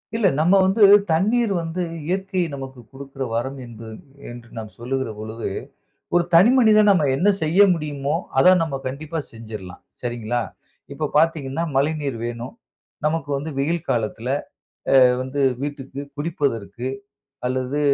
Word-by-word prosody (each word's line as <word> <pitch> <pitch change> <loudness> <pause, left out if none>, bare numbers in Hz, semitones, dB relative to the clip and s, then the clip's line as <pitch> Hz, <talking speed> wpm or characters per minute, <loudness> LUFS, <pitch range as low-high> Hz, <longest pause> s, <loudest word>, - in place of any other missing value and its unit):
இல்ல 225 -3 +3
நம்ம 165 +5 +4
வந்து 195 +3 +3 0.3
தண்ணீர் 215 +7 +2
வந்து 165 +2 -4 0.3
இயற்கை 190 +1 -1
நமக்கு 135 -2 -7
குடுக்குற 135 0 -7
வரம் 130 +4 -2
என்று, 115 -1 -10 0.4
என்று 120 0 -11
நாம் 110 -1 -6
சொல்லுகிற 130 +1 -3
பொழுது, 110 +1 -5 0.7
ஒரு 175 - +5
தனி 185 +7 +7
மனிதனா 215 -4 +6
நம்ம 165 -7 +3
என்ன 180 +9 +3
செய்ய 160 +4 +1
முடியுமோ! 145 -3 -2 0.2
அத 180 +8 +7
நம்ம 155 -4 -3
கண்டிப்பா 155 +5 -4
செஞ்சிரலாம், 110 -5 -9 0.2
சரிங்களா! 120 -1 -2 0.5
இப்ப 150 +1 -3
பாத்தீங்கன்னா 160 -1 +1
மழைநீர் 145 -2 0
வேணும். 120 - -6 0.5
நமக்கு 155 0 -1
வந்து 145 +3 -5
வெயில் 165 +4 -1
காலத்துல 115 +1 -1 0.7
அ - - +6 0.2
வந்து 130 +2 -4 0.2
வீட்டுக்கு 140 -1 -5 0.2
குடிப்பதற்கு 130 - -2 0.6
அல்லது, 130 +3 -1
140 Hz, 130 wpm, -22 LUFS, 120-165 Hz, 0.7 s, தனி